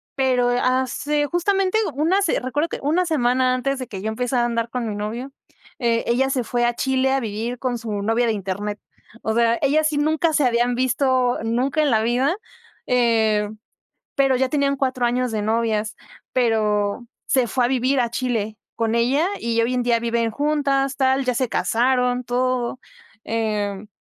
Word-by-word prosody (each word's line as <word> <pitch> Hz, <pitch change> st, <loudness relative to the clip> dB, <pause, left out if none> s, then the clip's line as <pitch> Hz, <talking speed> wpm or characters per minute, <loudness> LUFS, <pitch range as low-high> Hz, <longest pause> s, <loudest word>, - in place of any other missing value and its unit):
pero 255 Hz, -2 st, +2 dB
hace 260 Hz, +4 st, 0 dB
justamente 380 Hz, +4 st, +1 dB, 0.2 s
una 340 Hz, +7 st, +2 dB
se -, -, +1 dB
recuerdo 290 Hz, +6 st, -2 dB
que -, -, -5 dB
una 330 Hz, +6 st, +2 dB
semana 255 Hz, -5 st, +2 dB
antes 275 Hz, +2 st, -1 dB
de 255 Hz, -, -5 dB
que 190 Hz, -2 st, -7 dB
yo 215 Hz, -, -4 dB
empezara 245 Hz, +2 st, 0 dB
a -, -, +2 dB
andar 230 Hz, -1 st, -1 dB
con 240 Hz, -2 st, -3 dB
mi 210 Hz, -, -3 dB
novio, 230 Hz, +6 st, -5 dB, 0.5 s
eh, 230 Hz, -2 st, +1 dB
ella 260 Hz, +3 st, +2 dB
se 255 Hz, -2 st, 0 dB
fue 240 Hz, +1 st, 0 dB
a 240 Hz, -, 0 dB
Chile 265 Hz, +1 st, +1 dB
a 270 Hz, -, +2 dB
vivir 230 Hz, +3 st, -4 dB
con 250 Hz, -2 st, -1 dB
su 230 Hz, -1 st, -6 dB
novia 225 Hz, +3 st, +1 dB
de 225 Hz, -, +1 dB
Internet. 205 Hz, +1 st, -4 dB, 0.4 s
O 220 Hz, -, 0 dB
sea, 235 Hz, 0 st, +3 dB
ellas 305 Hz, +2 st, +3 dB
sí 300 Hz, -, -2 dB
nunca 315 Hz, +2 st, +1 dB
se 295 Hz, -3 st, +3 dB
habían 240 Hz, 0 st, +2 dB
visto 255 Hz, 0 st, +1 dB
nunca 255 Hz, +7 st, 0 dB
en 295 Hz, -, +2 dB
la 220 Hz, -1 st, +3 dB
vida, 255 Hz, +9 st, +1 dB, 0.5 s
eh, 220 Hz, -4 st, +2 dB, 0.7 s
pero 270 Hz, -2 st, +3 dB
ya 260 Hz, 0 st, +1 dB
tenían 280 Hz, -2 st, +1 dB
4 260 Hz, -2 st, -1 dB
años 250 Hz, 0 st, 0 dB
de 215 Hz, -1 st, -1 dB
novias, 220 Hz, -1 st, 0 dB, 0.4 s
pero 215 Hz, -2 st, +1 dB, 0.2 s
se 255 Hz, -3 st, +2 dB
fue 255 Hz, -2 st, +1 dB
a -, -, -1 dB
vivir 260 Hz, +1 st, +1 dB
a 235 Hz, -1 st, 0 dB
Chile 225 Hz, -4 st, -2 dB, 0.2 s
con 230 Hz, -1 st, 0 dB
ella 270 Hz, +9 st, +2 dB
y 230 Hz, 0 st, 0 dB
hoy 235 Hz, -, 0 dB
en 250 Hz, -, +1 dB
día 235 Hz, -1 st, +2 dB
viven 230 Hz, 0 st, 0 dB
juntas, 280 Hz, -1 st, 0 dB
tal, 265 Hz, 0 st, +2 dB
ya 250 Hz, -1 st, 0 dB
se 255 Hz, 0 st, 0 dB
casaron, 250 Hz, +2 st, +1 dB
todo, 250 Hz, 0 st, -1 dB, 0.4 s
em, 210 Hz, -3 st, -2 dB
245 Hz, 180 wpm, -22 LUFS, 230-270 Hz, 0.7 s, sea